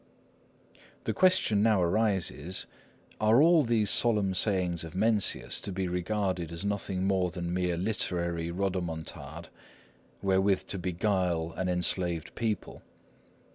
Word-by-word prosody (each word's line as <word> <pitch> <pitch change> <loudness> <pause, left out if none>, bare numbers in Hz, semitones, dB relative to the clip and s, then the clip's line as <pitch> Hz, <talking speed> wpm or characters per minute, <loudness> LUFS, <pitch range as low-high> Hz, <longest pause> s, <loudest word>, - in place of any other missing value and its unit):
The - - -1
question 185 - +3
now 110 -2 +4
arises, 95 -3 0 0.5
Are 110 +3 +4
all 165 +1 +6
these 115 -4 +1
solemn 105 -5 +2
sayings 90 -4 +2
of 80 +1 -9
Mencius 105 +1 +1
to 100 - -6
be 95 0 -2
regarded 90 -1 -2
as 85 +4 -4
nothing 100 -2 -2
more 95 -2 +1
than 85 0 -4
mere 90 -1 0
literary 85 -4 -2
rodomontade, 85 -4 -4 0.7
wherewith 95 0 +2
to 100 - -3
beguile 90 -2 0
an 95 -1 -2
enslaved 90 -2 -1
people? 110 -3 -3
95 Hz, 120 wpm, -29 LUFS, 85-105 Hz, 0.7 s, all